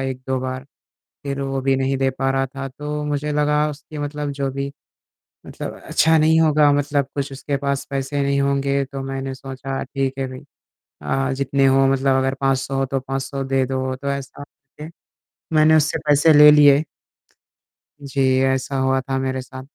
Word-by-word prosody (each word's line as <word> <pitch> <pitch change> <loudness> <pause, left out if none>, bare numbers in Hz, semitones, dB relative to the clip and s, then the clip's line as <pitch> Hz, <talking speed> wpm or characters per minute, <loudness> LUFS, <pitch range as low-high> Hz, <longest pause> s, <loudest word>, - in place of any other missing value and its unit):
1-2 130 0 -3
बार 130 0 -5 0.6
फ़िर 140 -1 -3
वो 135 -1 -2
भी 135 0 +2
नहीं 135 0 0
दे 135 0 +1
पा 135 0 +1
रहा 135 0 0
था। 135 0 -6
तो 150 +2 -5
मुझे 150 0 -2
लगा 150 0 +1
उसकी 150 +1 -10
मतलब 145 0 -4
जो 140 -1 -2
भी 140 +1 -4 0.7
मतलब - - -7
अच्छा 160 0 +3
नहीं 160 +1 +4
होगा 150 -2 +4
मतलब 145 0 0
कुछ 140 -1 -3
उसके 140 +1 -3
पास 140 0 -2
पैसे 140 +1 -2
नहीं 140 0 +1
होंगे 140 0 +1
तो 135 +1 -7
मैंने 135 0 -4
सोचा 135 0 -6
ठीक 135 -1 -2
है 135 - -1 0.5
भाई 135 0 -3
जितने 140 0 +1
हो 135 0 +4
अ, - - +4
मतलब 135 0 +2
अगर 135 0 0
500 135 0 0
तो 135 0 -2
500 135 +1 -4
दे 135 0 0
दो 130 0 -2
तो 140 +2 -8
ऐसा 140 0 -6
करके 145 +2 -13 0.7
मैंने 155 +1 +5
उससे 155 -1 +1
पैसे 150 +2 +5
ले 150 0 +10
लिए। 145 0 +6 1.2
जी 135 0 -1 0.3
ऐसा 135 +1 -2
हुआ 130 0 +1
था 135 0 -3
मेरे 130 0 -2
साथ। 130 0 -10
135 Hz, 175 wpm, -21 LUFS, 135-145 Hz, 1.2 s, ले